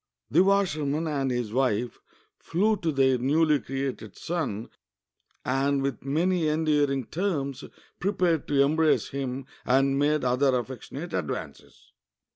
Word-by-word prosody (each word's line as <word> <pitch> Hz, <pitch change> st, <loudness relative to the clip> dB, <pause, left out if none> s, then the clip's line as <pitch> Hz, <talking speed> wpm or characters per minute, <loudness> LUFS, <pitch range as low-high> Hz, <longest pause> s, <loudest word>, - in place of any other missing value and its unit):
The 170 Hz, +6 st, +5 dB
washerman 165 Hz, -6 st, +1 dB
and 140 Hz, -4 st, -1 dB
his 120 Hz, -4 st, -2 dB
wife 125 Hz, -3 st, 0 dB, 0.4 s
flew 205 Hz, +6 st, +1 dB
to 165 Hz, -4 st, -1 dB
their 130 Hz, -3 st, +3 dB
newly 150 Hz, +3 st, +3 dB
created 135 Hz, -7 st, -5 dB
son, 140 Hz, -11 st, -3 dB, 0.7 s
and 135 Hz, +2 st, +1 dB
with 135 Hz, -4 st, -3 dB
many 165 Hz, +4 st, +1 dB
endear 150 Hz, -2 st, +2 dB
ing 135 Hz, -1 st, -1 dB
terms 145 Hz, -, -2 dB, 0.4 s
prepared 180 Hz, -5 st, +1 dB
to 140 Hz, -1 st, +4 dB
embrace 155 Hz, +2 st, +2 dB
him 135 Hz, -1 st, -4 dB, 0.2 s
and 135 Hz, +2 st, +2 dB
made 150 Hz, 0 st, +2 dB
other 125 Hz, +1 st, +3 dB
affectionate 135 Hz, +6 st, -6 dB
advances. 85 Hz, -5 st, -6 dB
140 Hz, 125 wpm, -27 LUFS, 130-160 Hz, 0.7 s, The